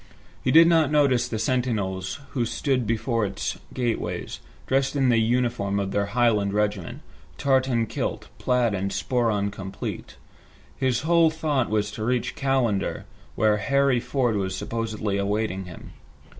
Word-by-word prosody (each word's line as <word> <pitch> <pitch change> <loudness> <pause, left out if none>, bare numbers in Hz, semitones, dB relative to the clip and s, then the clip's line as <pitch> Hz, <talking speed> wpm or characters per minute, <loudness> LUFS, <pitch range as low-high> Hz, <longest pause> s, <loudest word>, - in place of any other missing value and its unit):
He - - 0
did 165 +5 +8
not 165 -3 +4
notice 140 -5 +3
the 115 - -3
sentinels 105 -6 -1
who 125 - 0
stood 120 +1 -1
before 115 +1 0
its 100 -1 -3
gateways, 120 -3 -3 0.3
dressed 135 +1 +1
in 135 -2 +3
the 115 -2 +4
uniform 115 -4 0
of 100 -1 -2
their 100 0 0
Highland 105 -3 +2
regiment, 105 -3 -1 0.4
tartan 130 -4 +2
kilt, - - -4
plaid 125 -3 +1
and 100 0 -1
sporran 110 -4 0
complete. 95 0 -6 0.6
His 130 -2 0
whole 165 +1 +4
thought 155 -5 -1
was 105 -1 0
to 110 - -6
reach 125 +1 0
Callander 130 -7 0 0.3
where 105 0 +3
Harry 140 +3 +2
Ford 120 -3 0
was 95 -1 -2
supposedly 110 -1 -3
awaiting 100 -1 -1
him. 90 -2 -11
115 Hz, 145 wpm, -25 LUFS, 100-130 Hz, 0.6 s, did